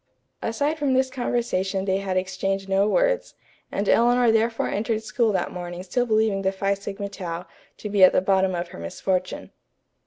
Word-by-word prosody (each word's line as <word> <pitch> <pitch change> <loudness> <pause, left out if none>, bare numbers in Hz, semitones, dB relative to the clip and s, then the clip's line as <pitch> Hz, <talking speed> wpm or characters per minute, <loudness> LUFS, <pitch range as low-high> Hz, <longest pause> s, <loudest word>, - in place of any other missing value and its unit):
Aside 285 +8 -1
from 275 -3 +1
this 260 0 +2
conversation 200 -7 -1
they 190 -1 +1
had 190 -1 -2
exchanged 190 +1 -2
no 195 +1 +2
words, - - +1 0.4
and 200 +1 -2
Eleanor 240 0 +4
therefore 225 +1 +1
entered 220 +1 -1
school 230 0 +1
that - - -1
morning 175 0 -6
still 245 +7 -1
believing 215 -3 +2
the 190 0 +1
Phi 195 +1 0
Sigma 200 0 -5
Tau 180 -3 -6 0.3
to - - -6
be 200 -2 +3
at 185 - +9
the - - +3
bottom 190 0 +2
of 175 0 -4
her - - -10
misfortune. 185 - -3
200 Hz, 180 wpm, -24 LUFS, 190-230 Hz, 0.4 s, at